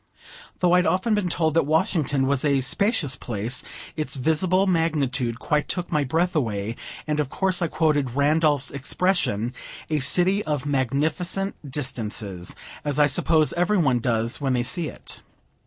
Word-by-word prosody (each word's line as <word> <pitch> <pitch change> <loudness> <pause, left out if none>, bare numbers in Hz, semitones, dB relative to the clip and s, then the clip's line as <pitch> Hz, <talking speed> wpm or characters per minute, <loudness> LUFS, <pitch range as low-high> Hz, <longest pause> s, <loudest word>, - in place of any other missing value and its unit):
Though 180 -1 +4
I'd 180 0 +4
often 190 +5 +1
been 205 -4 +1
told 160 -2 +1
that 165 -3 +2
Washington 150 -3 +1
was 140 -1 0
a 140 -2 +2
spacious 145 - +1
place, 115 0 -3 0.3
its 155 -2 -1
visible 170 +7 +2
magnitude 140 -9 0
quite 150 +4 0
took 180 -1 -3
my 150 -3 +2
breath 170 +6 0
away, 110 -5 -1 0.3
and 150 -1 -1
of 145 -3 0
course 190 +2 0
I 170 - +2
quoted 145 -6 0
Randolph's 145 -1 +2
expression, 140 - 0 0.4
"a 155 - +2
city 180 +8 +3
of 150 -3 -2
magnificent 150 - 0 0.2
distances," 110 -9 -4 0.3
as 145 -2 -2
I 150 - +6
suppose 155 +2 +2
every 180 +4 +1
one 135 -8 +2
does 115 +1 -1
when 135 -2 +1
they 125 -1 +1
see 165 +6 -1
it. - - -7
150 Hz, 155 wpm, -24 LUFS, 130-170 Hz, 0.4 s, I